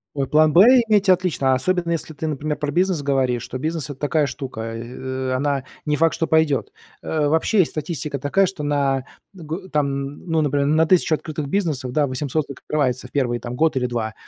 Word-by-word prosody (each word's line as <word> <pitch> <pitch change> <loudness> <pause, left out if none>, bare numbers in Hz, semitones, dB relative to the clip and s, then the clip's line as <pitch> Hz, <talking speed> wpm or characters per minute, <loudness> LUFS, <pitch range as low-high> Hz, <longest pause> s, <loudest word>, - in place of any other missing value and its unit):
Ой, 135 -2 -1
план 155 0 +4
"Б" 175 - +8 0.3
иметь- 205 -2 +3
отлично, 170 -8 +2
особенно 175 +5 0
если 165 -1 -3
ты, 160 +2 -4
например, 150 0 -2
про 145 -1 -2
бизнес 180 -1 +1
говоришь, 130 -4 0
то 130 - -5
бизнес 155 +1 -3
это 140 -2 -8
такая 150 0 +1
штука, 135 -6 -6
э, 130 +3 -5
она 140 0 0 0.2
не 150 - +2
факт, 165 +2 +2
что 165 - -1
пойдет. 160 -3 +2 0.3
Э, 150 -2 0
вообще, 160 +7 +2
есть 175 - +3
статистика 150 -2 -4
такая, 145 +9 +2
что 185 -4 -5
на 140 -2 0 0.3
дг 175 +2 -7
там, 150 -2 +1
н 140 +1 -5
ну, 160 -1 +2
например, 145 -1 +1
на 155 +2 +3
1000 165 -2 +3
открытых 155 -2 -5
бизнесов, 150 -7 -1
да, 150 -2 +2
800 140 +3 -2
закрывается 130 -2 -2
в - - -22
1, 120 -4 0
там, 120 +1 -6
год 155 +1 +2
или 125 -1 0
2, 115 -2 -3
145 Hz, 200 wpm, -21 LUFS, 130-160 Hz, 0.3 s, Б